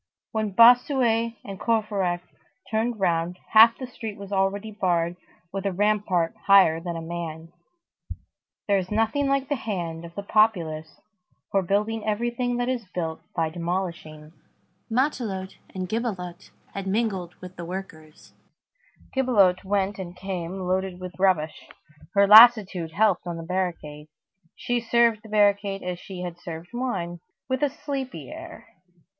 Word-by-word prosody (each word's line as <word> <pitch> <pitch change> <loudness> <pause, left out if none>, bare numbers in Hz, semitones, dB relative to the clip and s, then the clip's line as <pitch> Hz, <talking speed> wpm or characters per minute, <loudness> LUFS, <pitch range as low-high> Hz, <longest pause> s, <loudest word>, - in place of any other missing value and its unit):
When 215 -3 -2
Bossuet 235 -1 +5
and 195 -1 -7
Courfeyrac 205 -6 0 0.5
turned 225 +1 0
round, 170 -1 0
half 225 +1 +8
the 260 - -5
street 225 -4 -7
was 200 0 -10
already 200 +2 0
barred 175 -4 0 0.4
with 195 -1 -3
a - - 0
rampart 195 -3 +1
higher 190 -5 +6
than 170 0 -5
a 165 - -5
man. 165 0 -6 1.1
There 200 -1 +3
is 185 -1 -5
nothing 225 +6 +1
like 275 -1 +1
the 290 - 0
hand 175 -9 -4
of 170 0 -11
the 200 - -5
populace 170 -8 +1 0.5
for 195 - +3
building 210 +4 -1
everything 240 +3 -1
that 245 0 -1
is 250 -5 -2
built 160 -2 -3
by 160 -2 0
demolishing. 170 -3 -4 0.6
Matelote 225 -7 -1 0.2
and 185 -1 -3
Gibelotte 190 -5 -4 0.2
had 195 -1 -5
mingled 190 -4 -1
with 180 0 -11
the 170 - -7
workers. 165 -4 -9 0.8
Gibelotte 205 -9 +3
went 200 0 -1
and 180 -1 -7
came 185 0 -5
loaded 185 0 -1
with 185 0 -9
rubbish. 175 -5 +1 0.5
Her 200 0 +6
lassitude 210 -6 +7
helped 200 -2 +2
on 170 -1 -4
the 165 - -6
barricade. 165 -4 -4 0.5
She 245 0 -1
served 230 -1 +3
the 220 - -14
barricade 200 -1 +2
as 180 -1 -4
she 185 -2 -8
would 175 -1 -4
have 175 - -26
served 165 0 -8
wine, 190 -9 -3 0.3
with 260 +1 -1
a 290 - +3
sleepy 275 -1 -6
air. 330 +1 -10
195 Hz, 145 wpm, -25 LUFS, 175-225 Hz, 1.1 s, half